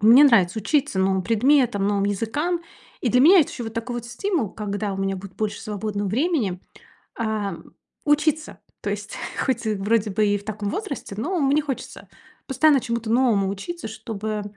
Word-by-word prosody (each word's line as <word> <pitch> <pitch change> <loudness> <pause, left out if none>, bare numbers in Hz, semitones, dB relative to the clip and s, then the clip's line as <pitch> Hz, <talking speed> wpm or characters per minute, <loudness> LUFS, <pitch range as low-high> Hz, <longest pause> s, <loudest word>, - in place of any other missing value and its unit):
мне 235 +7 +8
нравится 220 -7 +4
учиться 285 -3 0
новым 190 0 +2
предметам, 235 -1 +3
новым 200 -1 +1
языкам. 290 - -1 0.4
И 240 - +1
для 250 - +4
меня 350 +7 +8
это 295 - 0
ещё 240 - -6
вот 225 0 -7
такой 240 +2 -3
вот 235 0 -5
стимул, 270 - -1
когда 205 -1 -3
у 195 - -6
меня 195 0 0
будет 190 0 -10
больше 210 -2 -2
свободного 205 -2 -3
времени, 235 - 0 0.6
а, 215 -3 -1 0.5
учиться. 300 +1 +1 0.2
То - - -3
есть - - -5 0.3
хоть 260 -4 -1
вроде 215 +1 +1
бы 215 +2 +1
и 205 0 +2
в 200 - -11
таком 210 -1 -3
возрасте, 280 - -5
но 345 - -1
мне 280 +2 +3
хочется 275 -3 -6 0.4
постоянно 280 +1 +4
чему-то 235 -2 -3
новому 230 -6 +3
учиться, 220 - -5
чтобы 215 -1 -4
225 Hz, 175 wpm, -23 LUFS, 205-275 Hz, 0.6 s, мне